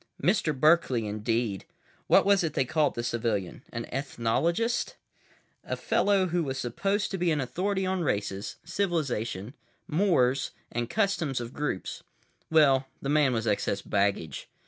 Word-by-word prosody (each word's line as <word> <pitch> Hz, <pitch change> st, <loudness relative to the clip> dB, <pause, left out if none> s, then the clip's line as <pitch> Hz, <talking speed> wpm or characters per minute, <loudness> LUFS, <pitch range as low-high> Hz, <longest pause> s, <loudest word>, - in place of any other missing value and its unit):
Mister 180 Hz, -4 st, +2 dB
Berkeley, 140 Hz, -5 st, +3 dB
indeed. 110 Hz, 0 st, -1 dB, 0.4 s
What -, -, +5 dB
was 200 Hz, -2 st, +4 dB
it 160 Hz, -3 st, -1 dB
they 135 Hz, -, +2 dB
called 150 Hz, +3 st, +1 dB
the 120 Hz, -, -3 dB
civilian—an 115 Hz, 0 st, -3 dB
ethnologist? 160 Hz, -, 0 dB, 0.7 s
A -, -, -3 dB
fellow 200 Hz, -2 st, +2 dB
who 175 Hz, -1 st, 0 dB
was 135 Hz, -2 st, -3 dB
supposed 195 Hz, -, -1 dB
to 190 Hz, -, -3 dB
be 175 Hz, 0 st, +2 dB
an 155 Hz, -2 st, +1 dB
authority 190 Hz, +8 st, -1 dB
on 185 Hz, -1 st, 0 dB
races, 100 Hz, -, -2 dB
civilizations, 145 Hz, -, -2 dB, 0.3 s
mores 150 Hz, -7 st, +2 dB, 0.2 s
and 120 Hz, 0 st, -2 dB
customs 190 Hz, -, 0 dB
of 120 Hz, 0 st, -6 dB
groups. 145 Hz, -10 st, -3 dB, 0.5 s
Well, 135 Hz, -4 st, +4 dB
the 140 Hz, -, -4 dB
man 145 Hz, -2 st, +4 dB
was 115 Hz, -2 st, -1 dB
excess 100 Hz, -2 st, 0 dB
baggage. 100 Hz, -5 st, -1 dB
135 Hz, 140 wpm, -28 LUFS, 115-175 Hz, 0.7 s, What